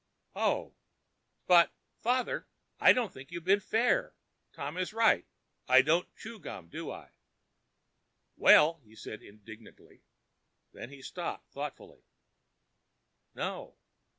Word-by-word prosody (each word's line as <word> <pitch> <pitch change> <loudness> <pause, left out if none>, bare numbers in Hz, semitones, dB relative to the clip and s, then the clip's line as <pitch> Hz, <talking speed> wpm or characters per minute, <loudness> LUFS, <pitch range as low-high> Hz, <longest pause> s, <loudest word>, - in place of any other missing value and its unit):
"Oh!" - - -1 0.7
"But, 175 -2 +6 0.3
father, 250 +2 -1 0.3
I - - +8
don't 240 -6 0
think 135 +2 -12
you 170 - -5
have 170 - -10
been 195 +2 +4
fair. 225 +4 +1 0.4
Tom 145 +3 -6
is 185 +3 -3
right. 225 -1 +3 0.4
I 130 +1 +7
don't 165 +5 +1
chew 225 0 -10
gum, 90 - -9
do - - -6
I?" - - -11 1.2
"Well——" 165 +2 +6
He 110 - -25
was 110 - -12
indignant. 110 +1 -12 0.9
Then 120 - -9
he 140 -1 -13
stopped - - -6
thoughtfully. - - -8 1.3
"No." - - -5
165 Hz, 120 wpm, -30 LUFS, 130-215 Hz, 1.3 s, I